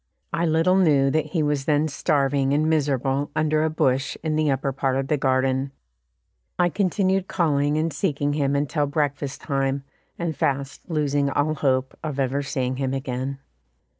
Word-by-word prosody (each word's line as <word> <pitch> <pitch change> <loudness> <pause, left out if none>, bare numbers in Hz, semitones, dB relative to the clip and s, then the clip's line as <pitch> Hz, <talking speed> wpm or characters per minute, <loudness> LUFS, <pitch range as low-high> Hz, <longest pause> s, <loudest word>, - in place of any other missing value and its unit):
I 170 0 +1
little 165 +4 +3
knew 145 -7 +4
that 155 +1 0
he 165 -5 -1
was 145 -2 0
then 150 0 +2
starving 140 -2 +1
and 155 +2 +2
miserable 140 -2 0
under 155 0 +2
a 160 - +1
bush 135 -3 0
in 155 -1 0
the 155 -1 +2
upper 135 0 0
part 135 0 -1
of 135 0 -2
the 150 - +3
garden. 130 0 +1 0.9
I 175 -1 +3
continued 190 0 +1
calling 145 -3 +1
and 160 +1 0
seeking 145 0 -1
him 140 -1 +1
until 145 +1 0
breakfast 145 -1 -2
time, 135 -1 -1 0.3
and 170 -2 -2
fast 140 +4 -2
losing 145 -3 +1
all 145 +3 +1
hope 130 -3 0
of 150 -3 -4
ever 135 +1 0
seeing 130 -2 -2
him 135 0 -1
again. 135 0 -3
145 Hz, 165 wpm, -24 LUFS, 135-155 Hz, 0.9 s, knew